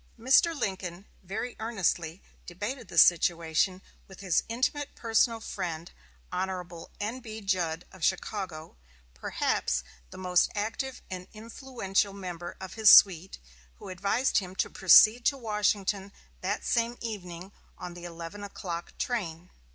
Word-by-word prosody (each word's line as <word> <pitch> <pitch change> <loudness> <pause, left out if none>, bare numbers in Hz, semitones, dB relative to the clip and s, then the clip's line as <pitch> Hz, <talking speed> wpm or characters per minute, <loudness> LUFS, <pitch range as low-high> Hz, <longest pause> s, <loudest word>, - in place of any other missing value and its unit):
Mr. 285 +7 +4
Lincoln 190 -1 -4 0.2
very 215 +6 -5
earnestly 190 -6 -1 0.2
debated 210 +8 -5
the - - -9
situation 170 +2 +4 0.2
with 190 - -14
his 190 -4 +2
intimate 260 +5 -1
personal 230 0 +2
friend, 170 -6 -5 0.4
Hon. 180 -2 -4
N.B. 220 0 -5
Judd 180 -4 -1
of 185 -3 -12
Chicago, 185 -4 -2 0.4
perhaps 65 0 -1 0.3
the - - -11
most 180 -1 +2
active 225 +6 -3
and 185 -1 -6
influential 220 -3 -2
member 175 -3 -7
of 190 -1 -8
his 220 -2 +5
suite, 185 -1 +7 0.4
who - - -11
advised 200 +9 +1
him 185 -2 -8
to - - -1
proceed 215 +6 +7
to 280 - +3
Washington 210 -3 0 0.3
that 195 +3 -2
same 235 0 0
evening 185 -5 -7 0.3
on 180 -1 -7
the 175 0 -11
eleven 170 +4 -8
o'clock 175 -4 -6
train. 180 -8 -3
195 Hz, 130 wpm, -29 LUFS, 175-220 Hz, 0.4 s, suite